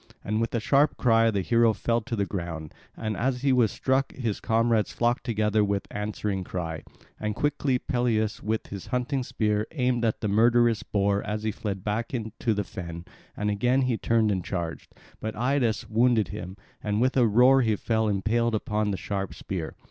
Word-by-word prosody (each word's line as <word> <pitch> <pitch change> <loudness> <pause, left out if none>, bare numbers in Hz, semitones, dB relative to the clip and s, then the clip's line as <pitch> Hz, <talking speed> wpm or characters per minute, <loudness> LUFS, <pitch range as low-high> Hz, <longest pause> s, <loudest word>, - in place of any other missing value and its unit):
And 110 +2 -1
with 115 - -1
a - - +2
sharp 140 +6 +3
cry 115 -2 +4
the 100 -3 0
hero 115 +2 +4
fell 115 +3 0
to 120 +1 -4
the 100 -2 0
ground; 85 -6 -5 0.2
and 110 -1 -3
as 125 +3 -1
he 135 -2 +4
was 120 -4 +3
struck 135 +1 0
his 115 -6 -3
comrades 115 -1 +1
flocked 120 +1 0
together 110 -3 +1
with 100 -1 -1
answering 105 -2 -3
cry. 85 -3 -4 0.4
And 105 -1 -2
quickly 145 -3 +1
Peleus 115 -4 0
with 110 +1 -2
his 100 -2 -8
hunting 125 +2 -1
spear 105 -3 -1
aimed 125 -4 0
at 110 -2 0
the 105 - 0
murderous 115 +2 +4
boar 100 0 0
as 105 0 -4
he 110 - 0
fled 100 -3 -5
back 115 +4 -2
into 110 -1 -2
the 105 - 0
fen; 85 -2 -7 0.3
and 105 0 0
again 125 +6 +2
he 125 -2 +1
turned 110 -1 +2
and 95 -3 -1
charged; 85 -3 -5 0.2
but 110 0 -4
Idas 125 -2 0
wounded 115 -1 +3
him, 95 -2 -7 0.3
and 105 0 0
with 130 +2 +2
a 125 -3 +5
roar 125 +5 +5
he 110 -3 +2
fell 110 +1 0
impaled 110 +3 +1
upon 105 0 -1
the 100 - -1
sharp 100 -1 -4
spear. 90 -5 -5
110 Hz, 190 wpm, -26 LUFS, 105-120 Hz, 0.4 s, a